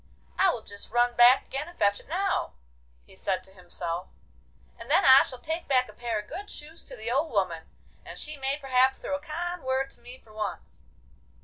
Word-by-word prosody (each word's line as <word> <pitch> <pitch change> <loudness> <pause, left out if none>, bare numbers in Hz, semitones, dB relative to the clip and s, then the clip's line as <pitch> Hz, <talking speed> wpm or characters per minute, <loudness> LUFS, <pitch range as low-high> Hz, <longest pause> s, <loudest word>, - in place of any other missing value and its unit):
'I 385 - +6
will 240 - -2
just 200 -1 -8
run 240 +1 +2
back 245 +2 +7
again 275 +4 -4
and 345 - -13
fetch 205 0 +2
it - - -17
now,' 380 +4 0 0.5
he - - -18
said 190 -2 -2
to 190 - -16
himself, 180 -1 -4 0.7
'and - - -10
then - - +4
I 265 +1 +10
shall 255 - -3
take 320 +7 -4
back 255 -2 +3
a - - -12
pair 235 -2 -3
of 210 - -9
good 395 +6 -7
shoes 320 +3 -8
to 260 - -9
the 225 +1 -3
old 285 +6 +1
woman, 185 -6 -1 0.3
and - - -9
she 305 0 -5
may 270 0 -1
perhaps 265 -2 +3
throw 285 - -3
a - - -4
kind 350 +3 -4
word 260 +1 0
to - - -16
me 245 +2 -10
for 220 -4 -20
once. 215 -1 -6
260 Hz, 215 wpm, -28 LUFS, 215-300 Hz, 0.7 s, I